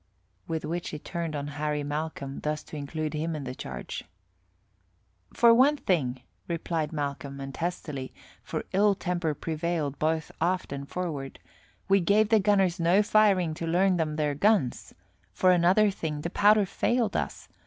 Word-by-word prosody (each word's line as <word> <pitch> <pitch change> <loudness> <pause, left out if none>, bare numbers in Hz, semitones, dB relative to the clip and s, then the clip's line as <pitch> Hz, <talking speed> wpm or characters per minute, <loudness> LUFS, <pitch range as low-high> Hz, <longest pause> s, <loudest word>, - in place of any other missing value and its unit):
With 160 -1 -3
which 170 +3 -3
he 150 - -5
turned 165 0 -4
on 145 -1 -3 0.2
Harry 150 -1 -1
Malcolm, 145 -2 -4
thus 150 0 -2
to - - -10
include 150 +1 -4
him 160 +1 -2
in 150 - -5
the 125 -1 -5
charge. - - -6 1.3
"For 235 -1 +6
one 275 +5 +5
thing," 130 - 0 0.2
replied 165 -2 -2
Malcolm, 140 -2 -4
and 135 0 -6
testily, 150 -6 -4 0.3
for - - -5
ill 200 +1 +4
temper 175 -5 -2
prevailed 160 -2 -2
both 160 0 0
aft 180 -3 0
and 140 0 -6
forward, 155 -7 -4 0.5
"we 195 0 +5
gave 205 +4 +3
the 220 -1 +5
gunners 195 -3 +2
no 175 +5 +4
firing 200 -6 +3
to 165 +1 -5
learn 180 +2 +3
them 155 -2 -1
their 150 -1 0
guns. 155 - +1 0.4
For 185 - +4
another 185 +4 +4
thing, 155 -5 -4
the 170 - -4
powder 210 +1 +5
failed 235 +3 0
us. - - -3
165 Hz, 160 wpm, -28 LUFS, 150-190 Hz, 1.3 s, For